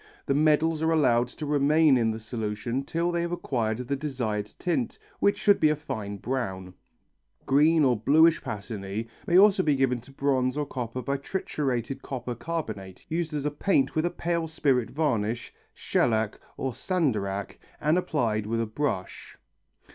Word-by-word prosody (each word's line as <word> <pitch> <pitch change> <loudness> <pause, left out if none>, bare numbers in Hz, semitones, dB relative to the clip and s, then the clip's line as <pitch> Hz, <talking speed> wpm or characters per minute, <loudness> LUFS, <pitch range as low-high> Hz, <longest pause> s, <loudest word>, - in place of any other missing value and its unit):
The 140 - +1
medals 155 +2 +3
are 160 - +2
allowed 125 -7 +3
to 150 +4 -7
remain 150 +1 +4
in 115 -3 +2
the 110 - -2
solution 110 +3 -3
till 170 +4 -1
they 170 0 0
have 170 0 -2
acquired 115 -10 -1
the 140 - 0
desired 125 -8 -2
tint, 200 +7 -1 0.2
which 200 0 +3
should 205 -1 +4
be 155 - +5
a 155 - +2
fine 105 -8 -5
brown. 95 -6 -3 0.7
Green 150 +3 +4
or 130 -3 +4
bluish 155 +9 +4
patinæ 105 0 -5 0.2
may 175 - +4
also 195 0 +6
be 150 -5 +2
given 130 -3 +1
to 130 - -16
bronze 135 -1 0
or 150 - 0
copper 125 -2 -5
by 140 +4 -1
triturated 135 - -3
copper 125 -2 -4
carbonate 115 - -5
used 165 0 -1
as 145 -1 -2
a 150 - +1
paint 145 -2 +1
with 155 +2 +1
a - - 0
pale 170 -1 -2
spirit 135 -6 +1
varnish, 120 -7 -1 0.2
shellac 110 -3 0 0.2
or 135 - -2
sandarac, 105 - -1 0.2
and 155 +3 +2
applied 115 -12 0
with 115 +1 -1
a 115 - +1
brush. 110 -4 -4
135 Hz, 165 wpm, -27 LUFS, 115-155 Hz, 0.7 s, also